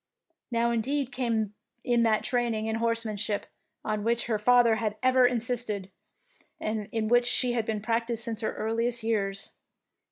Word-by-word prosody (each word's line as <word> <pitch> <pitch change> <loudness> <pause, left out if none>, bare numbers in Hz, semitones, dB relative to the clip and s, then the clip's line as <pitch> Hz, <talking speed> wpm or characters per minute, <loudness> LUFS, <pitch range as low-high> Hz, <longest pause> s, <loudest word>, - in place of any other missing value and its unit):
Now 235 -1 +1
indeed 265 +4 -1
came 225 -5 -1 0.3
in 240 -1 +2
that 225 -2 +2
training 240 -4 0
in 220 0 -1
horsemanship 225 -3 -1 0.4
on 215 -1 -1
which 235 +1 +1
her 220 -3 0
father 235 0 +5
had 215 -1 -2
ever 255 -1 +5
insisted, 230 -5 -2 0.7
and 215 -1 -3
in 225 -1 -1
which 240 +1 +4
she 250 0 +3
had 230 -2 0
been 215 -2 -1
practised 230 +1 -1
since 230 -1 -4
her 220 - -2
earliest 230 +2 -1
years. 200 -3 -1
230 Hz, 155 wpm, -28 LUFS, 215-240 Hz, 0.7 s, father